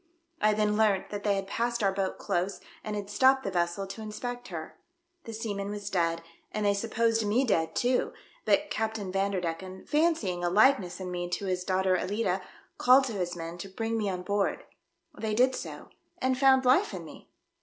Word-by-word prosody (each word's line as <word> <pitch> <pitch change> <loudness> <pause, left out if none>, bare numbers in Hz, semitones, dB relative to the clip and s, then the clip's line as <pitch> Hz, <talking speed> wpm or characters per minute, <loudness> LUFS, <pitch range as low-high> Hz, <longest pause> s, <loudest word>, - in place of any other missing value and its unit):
I 215 0 +4
then 210 0 +1
learnt 210 -3 +2
that 205 -1 -4
they 205 -1 +2
had 195 0 -2
passed 235 +3 -1
our 195 - +4
boat 190 0 -2
close, 185 +3 -1 0.2
and 215 -1 -4
had 205 -1 -4
stopped 265 +6 +4
the 195 - -2
vessel 175 +2 0
to 195 +3 -8
inspect 245 +3 -5
her. 160 -3 -7 0.5
The 230 - -6
sea 220 -1 -3
man 200 0 -4
was 205 -1 -5
dead, 165 -2 0 0.3
and 215 -1 -2
they 200 - +4
supposed 225 +2 +1
me 220 +6 +2
dead 160 -8 +1
too, 250 +1 +1 0.3
but - - +2
Captain 220 -3 -2
Vanderdecken, 190 -1 -2
fancying 295 - +1
a 175 - +2
likeness 205 -2 +3
in 185 -1 -5
me 175 0 -3
to 185 +3 -3
his 185 -1 -1
daughter 185 0 +2
Alicia, 190 0 -1 0.4
called 255 +2 +7
to 255 -4 -3
his 180 -3 -2
men 165 +1 -6
to 195 - -6
bring 225 +4 -2
me 215 -3 0
on 180 -1 -3
board. 200 +2 0 0.5
They 215 -1 -2
did 255 +3 +4
so - - -7 0.3
and 260 0 +1
found 265 0 +5
life 280 +12 +4
in - - -7
me." - - -13
205 Hz, 195 wpm, -29 LUFS, 185-225 Hz, 0.5 s, called